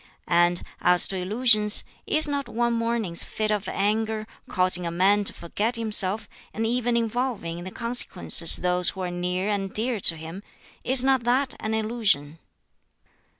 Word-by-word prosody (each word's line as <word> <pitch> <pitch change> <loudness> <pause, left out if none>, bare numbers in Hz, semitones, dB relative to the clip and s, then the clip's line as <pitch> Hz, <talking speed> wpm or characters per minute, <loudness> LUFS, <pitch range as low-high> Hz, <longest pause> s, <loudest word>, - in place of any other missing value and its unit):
And 175 0 +2 0.2
as 180 0 +5
to 195 - 0
illusions, 210 +2 +2 0.2
is 310 0 +1
not 285 -2 -4
one 235 0 -1
morning's 230 -6 0
fit 215 0 -3
of 205 -2 -2
anger, 215 +2 -2 0.2
causing 185 -1 +2
a 170 - -3
man 195 +4 +2
to - - +2
forget 210 +8 -3
himself, 215 -2 0 0.3
and 225 - -2
even 240 +1 -1
involving 230 -7 -3
in 175 - -9
the - - -6
consequences 230 -8 +3
those 180 0 +2
who 190 - -7
are 180 -1 -4
near 180 +2 -3
and 195 -2 -3
dear 230 +2 -2
to 165 -3 +4
him 165 +4 -9 0.4
is 260 0 +4
not 265 -2 +1
that 255 +3 0
an 220 0 -3
illusion?" 210 -10 -1
210 Hz, 160 wpm, -24 LUFS, 180-235 Hz, 0.4 s, as